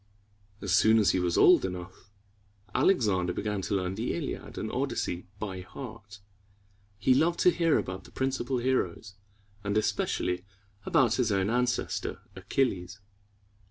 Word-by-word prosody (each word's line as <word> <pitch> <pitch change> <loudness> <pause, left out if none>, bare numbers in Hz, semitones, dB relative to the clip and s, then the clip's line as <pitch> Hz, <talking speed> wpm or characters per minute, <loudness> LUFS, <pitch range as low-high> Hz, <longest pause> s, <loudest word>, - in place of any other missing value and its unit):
As 100 - -2
soon 110 +1 +5
as 105 -3 +4
he 95 - +1
was 90 -1 0
old - - +6
enough, 90 +1 -6 0.6
Alexander 95 - +2
began 105 0 -2
to 100 - -2
learn 90 -1 -1
the 110 +5 -2
Iliad - - -5
and - - -3
Odyssey 90 +1 -2
by 95 -3 -5
heart; 105 -1 -10
and - - -27 0.8
he 130 +5 +3
loved 165 +6 +2
to 180 - +6
hear 165 -2 +2
about 95 0 -4
the - - -14
principal 130 -1 -1
heroes, 120 -6 -1 0.5
and 100 0 0
especially 90 -4 0 0.4
about 140 - +4
his 120 -4 +1
own 100 +1 +1
ancestor, 125 0 -1 0.2
Achilles. 100 -8 -1
105 Hz, 145 wpm, -29 LUFS, 95-125 Hz, 0.8 s, old